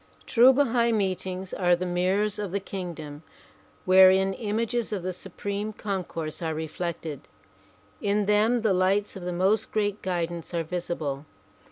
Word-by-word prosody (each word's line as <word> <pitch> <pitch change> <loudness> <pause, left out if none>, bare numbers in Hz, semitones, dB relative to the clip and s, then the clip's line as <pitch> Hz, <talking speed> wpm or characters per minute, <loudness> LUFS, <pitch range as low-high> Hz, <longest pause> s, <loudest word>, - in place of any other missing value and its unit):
True 250 +1 +6
Bahai 245 -3 +2
meetings 190 -3 -2
are 175 -1 +3
the 180 +1 -4
mirrors 185 +4 0
of 205 -4 -3
the 200 - -1
kingdom 170 -7 -7 0.6
wherein 190 +1 +6
images 225 +3 -2
of 200 -4 -3
the 185 0 -2
Supreme 200 +3 -5
Concourse 180 -7 -4
are 160 -1 -2
reflected. 160 -2 -5 0.7
In 205 0 +1
them 215 +4 +3
the 215 -3 +2
lights 195 +3 +1
of 190 - -7
the 180 0 -3
most 195 +5 +1
great 205 -1 -1
guidance 175 -2 -3
are 165 - 0
visible. 160 -4 -4
190 Hz, 145 wpm, -26 LUFS, 175-210 Hz, 0.7 s, True